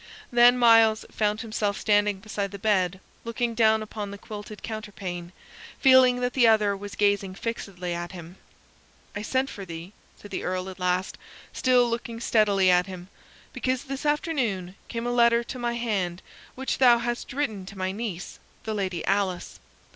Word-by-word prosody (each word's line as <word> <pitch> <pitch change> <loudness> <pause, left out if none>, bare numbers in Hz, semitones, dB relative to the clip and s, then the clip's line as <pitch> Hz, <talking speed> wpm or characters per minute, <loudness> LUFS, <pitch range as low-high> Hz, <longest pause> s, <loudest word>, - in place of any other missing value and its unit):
Then 240 +1 +6
Myles 225 -2 +5
found 210 0 0
himself 215 -3 -2
standing 205 -2 +2
beside 205 -1 -3
the 200 - -8
bed, 190 -3 +1 0.2
looking 230 0 -2
down 220 -1 +3
upon 210 -1 -6
the 200 - -8
quilted 210 0 -9
counterpane, 195 -6 -6 0.5
feeling 260 -2 +6
that 245 0 -1
the 245 -3 +5
other 210 -2 +4
was 200 +1 -8
gazing 200 -2 +1
fixedly 190 -6 -4
at 175 0 -5
him. 175 0 -10 0.8
"I 205 - -3
sent 260 +5 0
for 200 - -7
thee," 170 +2 -8 0.3
said 205 - -12
the - - -3
Earl 185 +1 -2
at 185 - -13
last, 180 +1 -1 0.3
still 250 -1 +3
looking 235 0 -4
steadily 205 -5 +3
at 180 +1 +3
him, 185 -1 -9 0.4
"because 255 -1 -1
this 275 -1 -6
afternoon 265 - -1
came 230 0 -4
a 245 - 0
letter 235 -1 +4
to 250 +2 -7
my 240 -1 -1
hand 195 -7 -2 0.3
which 265 +1 -3
thou 245 -2 +7
hadst 240 0 -3
written 220 -9 -3
to 200 - -10
my 185 0 -1
niece, 200 -4 -6 0.2
the 220 - -3
Lady 190 -5 -2
Alice. 195 -2 -1
210 Hz, 170 wpm, -26 LUFS, 190-235 Hz, 0.8 s, thou